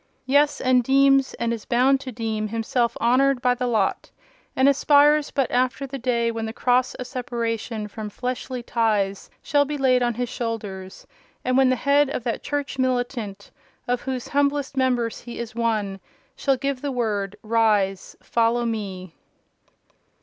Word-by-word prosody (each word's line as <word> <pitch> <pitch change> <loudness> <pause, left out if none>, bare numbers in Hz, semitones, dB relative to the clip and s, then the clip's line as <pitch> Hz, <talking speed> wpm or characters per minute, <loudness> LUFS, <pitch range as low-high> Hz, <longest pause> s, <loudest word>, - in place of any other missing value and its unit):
Yes, 285 +3 +3
and 255 -1 +3
deems, 275 +1 +3
and 235 0 -1
is 225 -2 -6
bound 260 +3 +3
to 260 - -6
deem, 220 -2 -3
himself 230 +2 -1
honoured 260 +3 +3
by 250 0 +2
the 250 0 -2
lot, 215 -5 0 0.5
and 265 +1 +4
aspires 290 +1 +4
but 275 -3 -1
after 255 +2 0
the 275 0 -6
day 235 -2 0
when 225 -1 -4
the 220 - -5
cross 250 +1 +1
of 255 - -6
separation 230 -3 -3
from 210 0 -7
fleshly 250 +2 -4
ties 210 -5 0
shall 290 0 +3
be 295 +1 -4
laid 255 -2 +3
on 240 -1 0
his 245 +1 -2
shoulders, 205 -6 -5 0.4
and 255 0 +1
when 265 -1 +5
the 255 - +3
Head 280 +2 +3
of 265 - -4
that 235 - -2
church 285 -2 -3
militant 245 -6 -2 0.4
of 245 0 0
whose 260 -2 -4
humblest 285 -1 0
members 250 -3 0
he 240 -1 -9
is 235 -1 -6
one, 215 -4 -1 0.4
shall 275 -2 +1
give 275 0 -2
the 285 -1 -2
word, 205 -5 -2
'Rise, 215 -4 +1
follow 235 +1 +1
Me! 195 -6 -4
245 Hz, 165 wpm, -23 LUFS, 225-265 Hz, 0.5 s, when